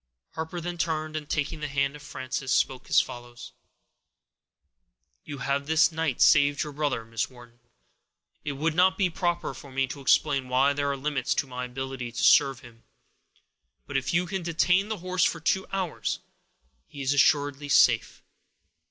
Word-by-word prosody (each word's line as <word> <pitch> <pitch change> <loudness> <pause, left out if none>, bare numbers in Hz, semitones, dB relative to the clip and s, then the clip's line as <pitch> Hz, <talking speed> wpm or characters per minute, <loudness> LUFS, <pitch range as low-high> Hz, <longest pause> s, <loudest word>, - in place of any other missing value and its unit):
Harper 160 +2 -5
then 175 0 -5
turned, 155 -1 -2
and, 150 -2 -5
taking 155 +1 -2
the 150 - -3
hand 140 0 -1
of 150 - -11
Frances, 130 -1 -5
spoke 130 0 0
as - - +6
follows:— 120 0 -6 1.7
"You 145 -1 -7
have 140 +2 -2
this 160 +1 +4
night 160 -5 +1
saved 145 -2 +4
your 150 -1 -7
brother, 145 -6 -2
Miss 115 0 -3
Wharton. 120 -2 -16 0.8
It 145 - -3
would 155 +4 -1
not 185 +3 +3
be 185 -3 +1
proper 175 0 -1
for 140 - -12
me 135 +1 +1
to 140 +1 -8
explain 135 -1 +2
why 135 +3 +3
there 140 0 -1
are 140 - -3
limits 140 0 -1
to - - 0
my 125 -1 -5
ability 130 -1 -5
to 115 - -4
serve 135 -3 +5
him; 115 -3 -16 1.0
but - - -8
if 135 -1 0
you 175 +1 +2
can 190 +1 -3
detain 180 +4 +1
the 220 - -2
horse 185 -1 +1
for 165 - +1
two 190 +4 0
hours, 190 -4 -2 0.7
he 140 -1 -8
is 135 +2 +1
assuredly 145 0 +2
safe. 135 - +3
145 Hz, 170 wpm, -27 LUFS, 130-160 Hz, 1.7 s, as